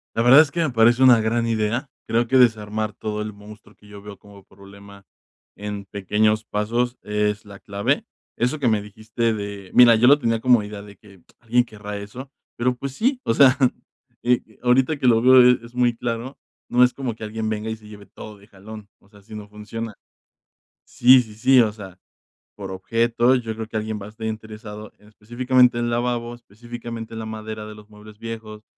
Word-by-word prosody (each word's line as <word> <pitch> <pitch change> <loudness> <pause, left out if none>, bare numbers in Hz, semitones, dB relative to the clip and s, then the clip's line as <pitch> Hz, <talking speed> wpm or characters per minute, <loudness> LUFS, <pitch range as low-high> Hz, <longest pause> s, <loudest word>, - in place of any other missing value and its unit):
La 115 - +1
verdad 130 +5 +8
es 150 -3 -1
que 170 - -4
me 160 -3 +1
parece 120 +1 +3
una 125 -3 +7
gran 115 +1 0
idea. 115 +4 -1 0.2
Creo 115 +1 +1
que 130 +2 +2
desarmar 110 -3 +1
todo 105 -1 -5
el 105 -1 -7
monstruo 105 +1 -15
que 105 - -21
yo 105 -1 -12
veo 105 -1 -10
como 100 -1 -17
problema 100 0 -16 0.5
en 105 -1 -6
pequeños 105 +3 0
pasos 120 +4 -2
es 105 0 -2
la 100 -1 -12
clave. 100 0 -2 0.3
Eso 125 +6 -1
que 130 - 0
me 110 -3 +2
dijiste 110 +2 -3
de 100 -2 -7
mira, 120 -2 +7
yo 115 - +3
lo 145 +2 +6
tenía 115 -3 0
como 120 -2 +4
idea 105 0 -8
de 100 -2 -14
que: 100 -4 -19 0.2
"¿Alguien 120 +2 +1
querrá 105 -3 -8
eso?", 120 +7 -9 0.3
pero, 125 +1 0
pues 140 +2 -6
sí, 250 - -1
o 115 - 0
sea, 135 0 +5 0.7
eh, 120 -3 -1
ahorita 130 +4 +2
que 130 - 0
lo 115 -2 +5
veo 130 +1 +7 0.2
es 120 - -15
muy 120 -1 +1
claro, 120 +3 -5 0.3
no 125 +1 +4
es 125 - +3
como 130 -5 -4
que 110 - -11
alguien 110 0 -4
venga 110 +1 -3
y - - -3
se 110 -1 -17
lleve 105 -1 -13
todo 105 0 -12
de 100 - -19
jalón, 105 0 -12
o 100 - -27
sea, 105 -1 -19
así 105 +2 -16
no 105 -1 -9
funciona. 105 +1 -7 0.9
Sí, 125 +1 +5
sí, 110 -2 -14
sí, 130 +4 +4
o 110 -3 +2
sea, 95 -4 -12 0.6
por 95 -2 -8
objeto, 115 +6 +1
yo 115 -3 -3
creo 110 0 -6
que 110 - -13
alguien 110 0 -4
va - - -7
a - - -10
estar 110 +1 -7
interesado 110 -1 -8
en 105 - -22
específicamente 125 +3 +1
en 120 0 -1
lavabos, 120 0 -2
específicamente 115 +1 -9
en 115 - -6
la 110 - -6
madera 110 0 -7
de 105 0 -10
los 105 0 -16
muebles 105 0 -15
viejos, 110 -2 -8
110 Hz, 205 wpm, -22 LUFS, 105-120 Hz, 0.9 s, verdad